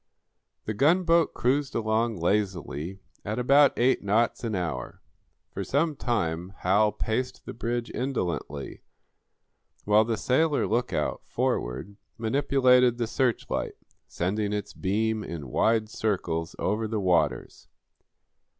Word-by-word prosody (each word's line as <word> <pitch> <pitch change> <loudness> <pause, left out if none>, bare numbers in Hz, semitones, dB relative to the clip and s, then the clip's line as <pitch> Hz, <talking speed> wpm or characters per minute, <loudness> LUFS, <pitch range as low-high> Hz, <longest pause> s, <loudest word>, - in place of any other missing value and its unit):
The 110 - -2
gunboat 165 - +3
cruised 135 +3 0
along 110 0 0
lazily 90 -2 -1 0.3
at 105 +2 -3
about 140 +3 +5
eight 130 +2 +3
knots 110 +4 +1
an 110 -3 -2
hour. 80 -9 -4 0.5
For - - -4
some 150 +2 0
time 95 -8 -2
Hal 105 +3 +3
paced 125 +5 -3
the - - -6
bridge 120 0 -3
indolently, 90 - -3 1.0
while 105 +1 +5
the 115 0 -2
sailor 145 +7 +2
lookout, 120 +3 -1
forward, 75 +12 -2 0.2
manipulated 125 0 +3
the 120 - 0
searchlight, 120 +1 -1 0.3
sending 100 +4 -2
its 105 -1 -4
beam 110 +3 -1
in 75 -8 -7
wide 110 - +2
circles 90 -7 -2
over 110 +3 -1
the 110 0 -2
waters. 90 -4 0
110 Hz, 115 wpm, -27 LUFS, 95-125 Hz, 1.0 s, about